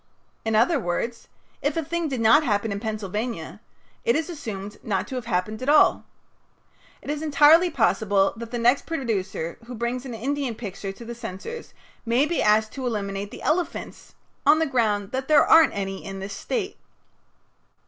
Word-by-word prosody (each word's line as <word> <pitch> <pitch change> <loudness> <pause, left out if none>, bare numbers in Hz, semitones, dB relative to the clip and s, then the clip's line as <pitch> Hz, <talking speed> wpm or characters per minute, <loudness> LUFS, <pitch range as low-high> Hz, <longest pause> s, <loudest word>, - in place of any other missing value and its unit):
In 220 -1 0
other 260 +8 +4
words, 230 +4 -3 0.3
if 290 +2 -1
a 325 - 0
thing 340 +1 -2
did 260 -4 -2
not 230 +7 +6
happen 215 -4 0
in 200 - -3
Pennsylvania 210 -4 -4 0.4
it 470 0 +2
is 325 +2 -1
assumed 210 - -7
not 195 -4 -1
to - - -7
have 250 -3 -4
happened 215 +2 -1
at 260 - -1
all. 300 +1 +5 1.0
It - - -3
is 300 0 -3
entirely 310 +3 +6
possible 205 - +2
that 230 0 -7
the 240 - -3
next 240 +3 +2
producer 210 - -3
who 245 - -7
brings 235 +2 -2
an 250 -4 -6
Indian 270 +1 -2
picture 195 -3 -6
to 215 +4 -11
the 235 - -6
censors 235 - -8 0.3
may 240 +4 +2
be 340 +2 -1
asked 215 +1 +3
to 260 -2 -4
eliminate 200 -3 -3
the - - -10
elephants 345 +3 -2 0.3
on 310 - +6
the 320 - +2
ground 215 -7 0
that 260 0 -3
"there 305 -2 +6
aren't 325 0 +6
any 195 -1 -4
in 195 0 -6
this 195 +1 -6
State." 405 - -3
230 Hz, 180 wpm, -24 LUFS, 205-285 Hz, 1.0 s, not